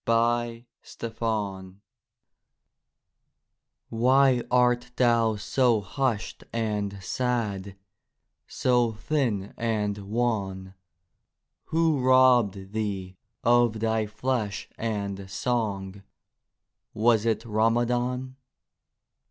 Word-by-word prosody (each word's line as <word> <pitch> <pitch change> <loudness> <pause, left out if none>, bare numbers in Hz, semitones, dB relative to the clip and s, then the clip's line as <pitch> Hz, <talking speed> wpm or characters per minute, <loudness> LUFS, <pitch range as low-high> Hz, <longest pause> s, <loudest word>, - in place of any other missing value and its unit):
FROM 115 +1 +1 0.3
THE 115 - -5
ARABIC 100 -5 -2 2.1
Why 130 +2 +4
art 125 0 +2
thou 115 -3 +3
so 115 +1 +2
hushed 115 +2 -2
and 105 -3 -2
sad, 105 -4 -2 0.7
So 120 -3 +1
thin 110 -5 -1
and 105 -3 -1
wan? 100 -3 -2 0.9
Who 160 -3 +1
robbed 125 -7 +4
thee 95 -4 -3 0.3
of 120 -2 +3
thy 110 -1 0
flesh 110 -1 -2
and 100 -3 -4
song,— 100 -3 -2 0.9
Was 115 0 +3
it 110 - +1
Ramadhan? 120 +3 0
115 Hz, 80 wpm, -26 LUFS, 100-120 Hz, 2.1 s, Why